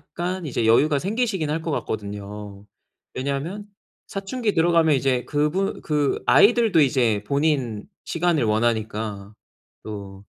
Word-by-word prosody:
약간 180 +1 -3
이제 120 -5 -1
여유가 140 +6 +4
생기시긴 195 - -1
할 160 +2 -1
것 165 - -3
같거든요. 105 -3 -5 0.5
왜냐하면 140 +10 -3 0.4
사춘기 210 +3 -2
들어가면 165 -2 +3
이제 130 -2 +1
그부 150 +6 0
그 150 -2 0
아이들도 220 -5 +5
이제 120 -7 +2
본인 140 -6 0 0.2
시간을 170 -4 +1
원하니까 110 -2 -1 0.5
또. 100 -2 -8
140 Hz, 285 characters per minute, -23 LUFS, 110-170 Hz, 0.5 s, 아이들도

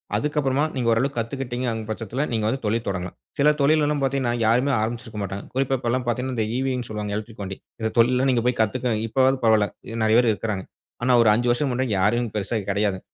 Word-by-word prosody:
அதுக்கப்பறமா 145 -2 +1
நீங்க 125 -3 -1
ஓரளவுக்கு 130 +4 +1
கத்துக்கிட்டீங்கங்ற 120 -1 -3
பட்சத்துல, 115 +4 -3
நீங்க 110 -2 0
வந்து 135 +5 -1
தொழில் 115 +2 0
தொடங்கலாம். 90 -2 -3 0.2
சில 150 +2 +6
தொழிலலாம் 150 0 +3
பாத்தீங்கன்னா, 130 -3 0
யாருமே 125 +5 +3
ஆரம்பிச்சுருக்க 115 -1 -4
மாட்டாங்க. 100 +1 -5
குறிப்பா, 135 0 +1
இப்பலாம் 125 +1 -1
பார்த்தீங்கன்னா 125 +2 -1
இந்த 110 - +1
ஈவீன்னு 130 -2 -1
சொல்லுவாங்க, 105 -1 -4
எலக்ட்ரிக் 110 0 -8
வண்டி. 95 0 -6 0.2
இந்த 110 - 0
தொழில்ல 125 +3 +4
நீங்க 125 -2 +2
போய் 125 - +1
கத்துக்க 120 +2 0
இப்போவாது 130 +3 +3
பரவால்ல, 110 -2 +4 0.2
இ - - -6
நெறைய 110 +1 +4
பேர் 120 -2 +3
இருக்குறாங்க. 100 -2 -3 0.4
ஆனா 125 - +3
ஒரு 110 - +5
5 120 +2 0
வருசம் 130 +2 0
முன்னாடி, 130 -1 -1
யாருமே 120 +5 +2
பெருசா 105 +2 -2
இங்க 100 - -8
கிடையாது. 100 -2 0
120 Hz, 195 wpm, -23 LUFS, 110-130 Hz, 0.4 s, சில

